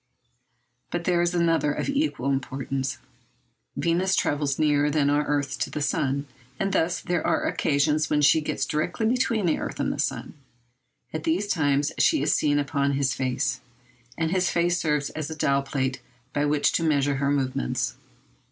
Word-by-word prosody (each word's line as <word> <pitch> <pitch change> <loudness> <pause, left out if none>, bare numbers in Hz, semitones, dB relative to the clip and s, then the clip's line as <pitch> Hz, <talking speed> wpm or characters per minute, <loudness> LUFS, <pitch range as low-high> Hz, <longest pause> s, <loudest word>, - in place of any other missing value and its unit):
But 175 -1 -3
there 175 0 +2
is 175 +1 0
another 165 -4 +2
of - - -3
equal 280 - 0
importance. 135 -1 -2 0.8
Venus 175 +3 +1
travels 145 -2 0
nearer 150 -1 +2
than 145 -1 +2
our 145 +1 +2
earth 145 -1 -1
to - - -1
the - - -4
sun. 140 -2 0 0.3
And 195 0 0
thus 175 -1 +1
there 175 -3 -1
are - - +1
occasions 150 +2 +1
when 150 - +2
she 155 +2 +5
gets 150 - -2
directly 170 +8 -1
between 230 -3 +1
the 165 - +1
earth - - -5
and - - 0
the - - -8
sun. - - -2 0.8
At 155 -1 -3
those 175 +6 +1
times 145 -6 +1
she 310 - +3
is - - +2
seen 145 -1 +2
upon 140 -1 0
his 135 -2 +1
face, 130 0 -1 0.6
and 160 0 0
his 180 -1 +2
face 175 +1 +1
serves 150 -3 0
as 155 -1 -5
a 160 - -5
dial 140 -2 +2
plate 135 -1 -2 0.3
by 145 0 +1
which 145 0 +2
to 165 - 0
measure 145 -3 +2
her 140 0 0
movements. 130 - -1
150 Hz, 175 wpm, -25 LUFS, 140-170 Hz, 0.8 s, she